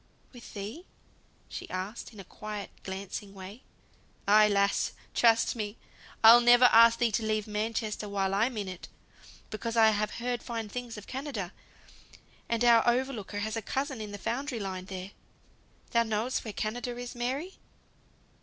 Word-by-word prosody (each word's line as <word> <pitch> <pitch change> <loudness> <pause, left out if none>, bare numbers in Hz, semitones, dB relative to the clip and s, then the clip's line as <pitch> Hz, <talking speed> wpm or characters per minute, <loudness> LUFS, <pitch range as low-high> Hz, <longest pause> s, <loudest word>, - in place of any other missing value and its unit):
"With 245 -2 -12
thee?" 215 - -7 0.6
she - - -8
asked, 190 +7 -5
in 215 - -13
a - - -7
quiet, 210 0 -7
glancing 195 +1 -6
way. 195 +5 -10 0.7
"Ay, 210 +1 +7
lass! 200 -1 +1 0.2
Trust 230 0 +4
me, 210 -1 -4 0.5
I'll 230 +2 +10
ne'er 240 +1 +6
ask 230 -1 +7
thee 240 -2 +2
to 220 +2 0
leave 215 -1 0
Manchester 215 0 -3
while 195 -1 0
I'm 225 +4 +1
in 205 -2 -3
it. 185 -2 -8 0.6
Because 230 +2 -4
I've 215 -2 +3
heard 240 0 -2
fine 225 -3 -5
things 240 0 -6
of 210 - -9
Canada; 260 -9 -5 1.0
and 235 0 +1
our 235 -1 +7
overlooker 240 -5 -1
has 220 +1 -2
a 225 - -2
cousin 265 +1 -3
in 210 -1 -6
the 205 - -6
foundry 245 +4 -3
line 190 -2 -4
there. 190 0 -7 0.8
Thou 235 - +4
knowest 225 +2 -1
where 215 - -6
Canada 240 +4 -3
is, 245 0 -6
Mary?" 265 +10 -3
220 Hz, 155 wpm, -29 LUFS, 205-240 Hz, 1.0 s, I'll